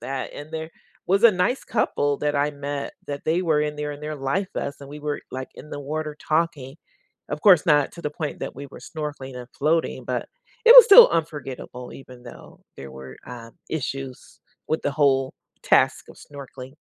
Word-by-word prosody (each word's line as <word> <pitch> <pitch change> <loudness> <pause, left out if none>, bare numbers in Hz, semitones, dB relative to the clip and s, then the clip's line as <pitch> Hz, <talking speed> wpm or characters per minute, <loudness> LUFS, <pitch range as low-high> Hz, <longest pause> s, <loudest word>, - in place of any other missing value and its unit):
that. 130 +2 -5
And 145 +2 -10
there 160 0 -5 0.4
was 200 +5 +2
a 225 - +8
nice 180 +9 0
couple 145 -10 0
that 150 -1 -1
I 145 +1 +1
met 140 0 -5 0.2
that 140 -1 -5
they 170 +3 +1
were 155 -4 +2
in 150 0 -2
there 150 0 -4
in 145 - -10
their 155 0 -5
life 145 +8 -2
vests, 140 0 -4
and 140 - -11
we 150 +1 -9
were, 150 0 -3
like, 130 0 -5
in 150 - -12
the 145 - -6
water 150 +1 -4
talking. 155 -4 -1 0.5
Of 150 - -4
course, 185 -6 +6
not 145 -3 +3
to 170 - -11
the 150 - -2
point 150 -1 -5
that - - -5
we 140 +1 -7
were - - -11
snorkeling 145 -4 -7
and 125 0 -9
floating, 160 +3 0
but - - -3 0.4
it 470 - +10
was - - +13
still 465 +2 +10
unforgettable 140 -6 -5
even 125 -2 -13
though 120 - -13 0.2
there 70 0 -9
were, 65 -1 -11
um, 115 -2 -10 0.2
issues 135 -3 -6 0.3
with 155 - 0
the 145 - -1
whole 135 -2 +1 0.3
task - - +2
of - - -14
snorkeling. 135 -2 -11
145 Hz, 200 wpm, -23 LUFS, 135-155 Hz, 0.5 s, was